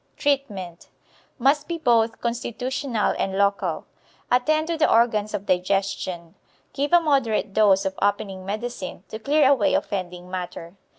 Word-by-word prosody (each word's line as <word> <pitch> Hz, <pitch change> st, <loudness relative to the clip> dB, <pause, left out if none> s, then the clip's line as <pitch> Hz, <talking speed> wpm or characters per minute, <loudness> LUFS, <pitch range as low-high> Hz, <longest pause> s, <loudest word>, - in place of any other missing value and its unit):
Treatment 205 Hz, -12 st, -2 dB, 0.5 s
Must 275 Hz, +4 st, +2 dB
be 340 Hz, -, -3 dB
both 230 Hz, -6 st, +2 dB
constitutional 240 Hz, +1 st, -2 dB
and 190 Hz, 0 st, -1 dB
local. 200 Hz, 0 st, 0 dB, 0.5 s
Attend 310 Hz, +6 st, +2 dB
to 335 Hz, +1 st, -2 dB
the 315 Hz, -, +3 dB
organs 220 Hz, -2 st, +2 dB
of 200 Hz, -, -5 dB
digestion. 185 Hz, -2 st, -1 dB, 0.4 s
Give 285 Hz, +1 st, -1 dB
a 345 Hz, -, +7 dB
moderate 255 Hz, -, +1 dB
dose 200 Hz, -2 st, +4 dB
of 190 Hz, 0 st, -3 dB
opening 200 Hz, -2 st, -1 dB
medicine, 205 Hz, -2 st, -5 dB
to 220 Hz, -, -6 dB
clear 285 Hz, +4 st, +3 dB
away 270 Hz, -6 st, +3 dB
offending 180 Hz, -2 st, -4 dB
matter. 180 Hz, -2 st, -6 dB
215 Hz, 135 wpm, -24 LUFS, 190-270 Hz, 0.5 s, a